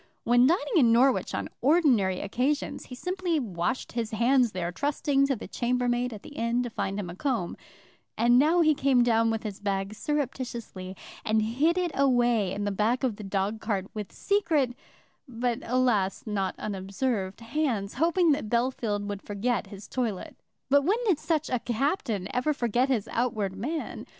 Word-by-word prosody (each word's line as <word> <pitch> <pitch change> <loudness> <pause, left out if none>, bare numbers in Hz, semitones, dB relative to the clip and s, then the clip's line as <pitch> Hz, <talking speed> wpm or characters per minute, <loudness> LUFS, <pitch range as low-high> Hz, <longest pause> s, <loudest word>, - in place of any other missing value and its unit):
When 245 +2 +5
dining 365 - +1
in 240 -7 +5
Norwich 255 +3 +3
on - - -3
ordinary 255 - +3
occasions, 255 +8 -1
he 250 - -8
simply 360 +2 -1
washed 190 -1 -2
his 230 -2 -2
hands 240 +2 +3
there, 175 -2 -3
trusting 275 +4 +1
to 275 - +1
the 230 - -8
chambermaid 245 0 0
at 210 -3 -9
the - - -11
inn 235 -1 0
to 240 - -5
find 195 -1 -2
him 195 - -4
a 175 - -7
comb; 235 -6 -1 0.6
and 240 +1 +5
now 325 +5 +4
he 310 -2 +5
came 270 -3 +3
down 230 -1 +3
with 225 -1 -2
his 205 -3 -5
bag 195 0 -2
surreptitiously, 240 -8 -4 0.3
and 220 0 +2
hid 285 +11 +1
it 355 -2 0
away 240 -7 +2
in 205 +2 -3
the 205 - 0
back 220 +6 0
of 240 -6 0
the 215 - -8
dog 200 +2 -2
cart 200 -4 -1
with 210 -3 -6
secret, 320 -11 +1 0.5
but 240 -1 -2
alas, 235 -6 +1
not 195 -4 -2
unobserved 195 +1 -3
hands, 230 -5 -1
hoping 335 +4 +3
that 280 -7 -1
Bellfield 235 -4 0
would 205 -1 -5
forget 220 +4 -2
his 200 -1 -10
toilet. 230 -7 -3 0.3
But 285 +1 +5
when 390 +9 +2
did 370 -9 +2
such 315 -2 0
a 250 - 0
Captain 235 - -1
ever 285 +4 +1
forget 245 +1 +1
his 235 -7 0
outward 215 -5 -1
man? 300 +11 -4
240 Hz, 175 wpm, -27 LUFS, 205-275 Hz, 0.6 s, When